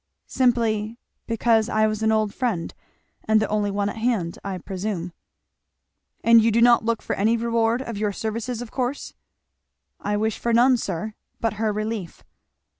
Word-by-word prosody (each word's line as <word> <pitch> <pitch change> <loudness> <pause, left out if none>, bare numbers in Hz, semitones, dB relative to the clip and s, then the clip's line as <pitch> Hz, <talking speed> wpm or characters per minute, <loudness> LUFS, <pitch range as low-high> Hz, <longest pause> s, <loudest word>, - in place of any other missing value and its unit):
"Simply 230 -3 +1 0.3
because 230 -1 +2
I 215 -2 +2
was 215 0 -1
an 220 0 +2
old 215 -2 +1
friend 225 -10 -2 0.5
and 220 0 +4
the 215 - 0
only 210 -1 0
one 200 0 -1
at 205 - -4
hand, 220 -7 -1
I 195 -2 -4
presume." 185 -1 -4 1.1
"And 230 0 +7
you 225 - +3
do 225 +1 +2
not 235 0 +5
look 230 0 -1
for - - -2
any 220 +4 +2
reward 230 +1 +1
of 230 -5 -6
your 210 -1 0
services, 225 +3 -4
of 230 - -12
course?" 255 +2 -3 0.9
"I 205 0 -1
wish 220 0 -1
for 235 - 0
none, 250 +2 +5
sir, 205 0 -4 0.3
but 225 -1 0
her 220 -1 +2
relief." 215 -4 -4
220 Hz, 170 wpm, -23 LUFS, 210-230 Hz, 1.1 s, And